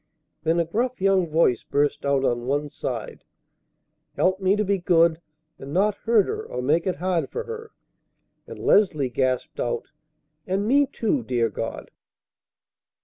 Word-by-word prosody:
Then 165 Hz, +1 st, +1 dB
a 170 Hz, -, +2 dB
gruff 240 Hz, +9 st, -2 dB
young 190 Hz, -2 st, +3 dB
voice 155 Hz, -5 st, +2 dB
burst 145 Hz, 0 st, 0 dB
out 140 Hz, -1 st, +2 dB
on 120 Hz, 0 st, -1 dB
one 145 Hz, +2 st, 0 dB
side, -, -, -5 dB, 0.9 s
"Help 185 Hz, +1 st, +2 dB
me 190 Hz, +1 st, +2 dB
to 210 Hz, 0 st, 0 dB
be 200 Hz, 0 st, +1 dB
good, 170 Hz, -2 st, +3 dB, 0.4 s
and 140 Hz, +2 st, -8 dB
not 205 Hz, +3 st, +3 dB
hurt 220 Hz, 0 st, +2 dB
her -, -, -3 dB
or 125 Hz, -, -6 dB
make 160 Hz, +7 st, +1 dB
it 185 Hz, -, 0 dB
hard 175 Hz, +1 st, -1 dB
for 470 Hz, -, -4 dB
her." 455 Hz, -1 st, -7 dB, 0.8 s
And -, -, -9 dB
Leslie 155 Hz, -10 st, +3 dB
gasped 130 Hz, 0 st, -1 dB
out, 120 Hz, -1 st, -3 dB, 0.6 s
"And 195 Hz, +3 st, 0 dB
me, 280 Hz, +3 st, +4 dB
too, 265 Hz, 0 st, -1 dB
dear 120 Hz, -, 0 dB
God!" 115 Hz, +3 st, -5 dB
170 Hz, 155 wpm, -24 LUFS, 140-205 Hz, 0.9 s, me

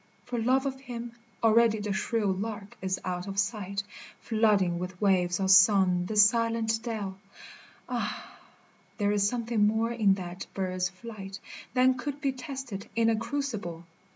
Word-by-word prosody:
for 245 Hz, -1 st, -3 dB
love 260 Hz, +4 st, +2 dB
of 265 Hz, -1 st, -3 dB
him 240 Hz, -3 st, -7 dB, 0.3 s
Already 225 Hz, 0 st, +5 dB
the 205 Hz, -1 st, -2 dB
shrill 205 Hz, 0 st, 0 dB
lark 205 Hz, +1 st, -5 dB
is 190 Hz, 0 st, -1 dB
out 180 Hz, 0 st, -3 dB
of 195 Hz, 0 st, -6 dB
sight, 200 Hz, -1 st, -1 dB, 0.4 s
Flooding 205 Hz, -6 st, +2 dB
with 180 Hz, 0 st, -6 dB
waves 180 Hz, -3 st, +2 dB
of 190 Hz, -1 st, +2 dB
song 190 Hz, -2 st, +6 dB
this 210 Hz, 0 st, +6 dB
silent 230 Hz, -1 st, 0 dB
dell, 205 Hz, -5 st, -4 dB, 0.4 s
— -, -, -19 dB, 0.3 s
Ah! -, -, -4 dB, 0.6 s
there 205 Hz, -2 st, +1 dB
is 205 Hz, -1 st, +2 dB
something 230 Hz, -3 st, +1 dB
more 220 Hz, +2 st, +1 dB
in 210 Hz, -5 st, +3 dB
that 180 Hz, 0 st, -7 dB
bird's 185 Hz, -1 st, -1 dB
flight 195 Hz, -1 st, -9 dB, 0.4 s
Than 255 Hz, 0 st, +4 dB
could 285 Hz, +2 st, -4 dB
be 275 Hz, -2 st, 0 dB
tested 260 Hz, -6 st, -7 dB
in 230 Hz, 0 st, +3 dB
a -, -, +2 dB
crucible 220 Hz, -, -4 dB
210 Hz, 155 wpm, -28 LUFS, 190-235 Hz, 0.6 s, song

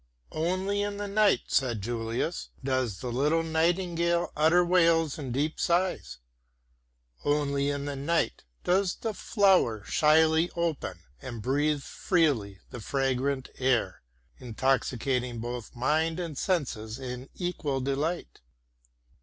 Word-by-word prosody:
"Only 185 Hz, +5 st, 0 dB
in 205 Hz, 0 st, -2 dB
the 205 Hz, 0 st, -4 dB
night," 205 Hz, 0 st, +3 dB
said 120 Hz, -6 st, 0 dB
Julius, 115 Hz, -, -3 dB
"does 130 Hz, -7 st, -1 dB
the 125 Hz, -, -3 dB
little 150 Hz, +7 st, +2 dB
nightingale 170 Hz, +1 st, +1 dB
utter 165 Hz, +4 st, +4 dB
wails 165 Hz, -4 st, +3 dB
and 135 Hz, -4 st, -5 dB
deep 145 Hz, +5 st, -1 dB
sighs. 180 Hz, -, 0 dB, 1.1 s
Only 145 Hz, -1 st, +1 dB
in 145 Hz, 0 st, -2 dB
the 145 Hz, -1 st, -3 dB
night 155 Hz, +5 st, -1 dB, 0.2 s
does 185 Hz, +1 st, +2 dB
the 225 Hz, -2 st, -3 dB
flower 190 Hz, -, +2 dB
shyly 160 Hz, +4 st, +4 dB
open 170 Hz, -3 st, -2 dB, 0.2 s
and 120 Hz, -3 st, -6 dB
breathe 145 Hz, +2 st, +1 dB
freely 130 Hz, -, 0 dB
the 120 Hz, -, -7 dB
fragrant 135 Hz, +2 st, -1 dB
air, 130 Hz, -2 st, +1 dB, 0.4 s
intoxicating 125 Hz, 0 st, 0 dB
both 120 Hz, +1 st, -6 dB
mind 160 Hz, +7 st, +1 dB
and 170 Hz, -4 st, -4 dB
senses 125 Hz, -, -2 dB
in 130 Hz, 0 st, -7 dB
equal 165 Hz, -6 st, -2 dB
delight. 140 Hz, +6 st, -2 dB
145 Hz, 120 wpm, -28 LUFS, 130-170 Hz, 1.1 s, utter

